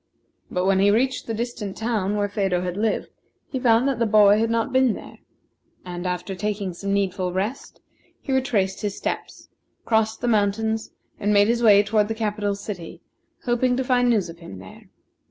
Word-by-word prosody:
But 180 0 -1
when 190 0 +3
he 200 +1 +4
reached 255 +5 +1
the 225 - -2
distant 225 -4 -4
town 215 -3 -1
where 205 0 +1
Phedo 195 -3 0
had 180 -1 -3
lived, 215 +2 -1 0.4
he 260 - -2
found 240 0 +3
that 270 -4 -1
the 230 - +2
boy 210 -1 +6
had 225 0 +1
not 230 +3 -1
been 260 -3 +4
there; - - -11 0.7
and 175 0 -5
after 180 +2 -3
taking 200 -1 -3
some 195 +3 -4
needful 190 -2 0
rest, 200 +9 -4 0.4
he 270 - -4
retraced 210 -8 0
his 205 -2 -3
steps, - - -5 0.4
crossed 220 -1 +1
the 245 - -1
mountains, 220 0 0 0.3
and 205 - 0
made 205 0 +5
his 235 +1 +1
way 205 -3 +6
toward 210 0 +1
the 225 - -3
capital 210 -2 -1
city, 200 -4 -8 0.4
hoping 245 0 +1
to 265 - 0
find 245 -1 +2
news 215 -6 +2
of 165 0 -11
him 165 - -10
there. 95 0 -13
210 Hz, 190 wpm, -23 LUFS, 195-230 Hz, 0.7 s, boy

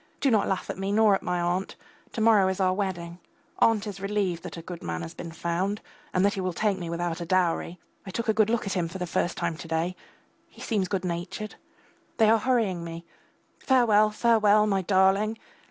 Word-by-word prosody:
Do 275 - +2
not 210 -3 +3
laugh 190 - -2
at - - -9
me 195 +1 -2
nor 215 0 +5
at 195 - +1
my 180 0 -1
aunt. 175 +2 -1 0.4
To 225 - -3
morrow 215 -4 +5
is 190 +1 -2
our 185 -1 +3
wedding. 180 -3 -4 0.4
Aunt 225 -2 +3
is 200 -2 -6
relieved 195 -4 -1
that - - -8
a 165 - -8
good 175 0 -8
man 85 0 -4
has 80 - -7
been 170 - -8
found, 175 +5 -2 0.3
and 185 +2 +2
that 200 - +2
he 195 - -3
will 185 -1 -2
take 200 +1 0
me 170 -2 -5
without 170 0 -3
a - - -3
dowry. 180 -1 0 0.2
I 195 - -9
took 230 +5 -3
a 220 - +3
good 215 0 +3
look 235 0 0
at 195 - -2
him 175 -3 0
for 165 - -7
the 180 - -3
first 175 +1 -1
time 165 - -2
to 165 - -9
day. 165 +3 -1 0.5
He - - -19
seems 205 -5 -1
good 190 -1 -2
natured. 175 +5 -4 0.6
They 220 -2 +5
are 225 - +4
hurrying 220 -9 0
me. 165 0 -7 0.5
Farewell, 220 -5 +4
farewell.... 215 -1 +4
My 195 -2 +1
darling!! 195 +3 +2
190 Hz, 220 wpm, -26 LUFS, 175-215 Hz, 0.6 s, nor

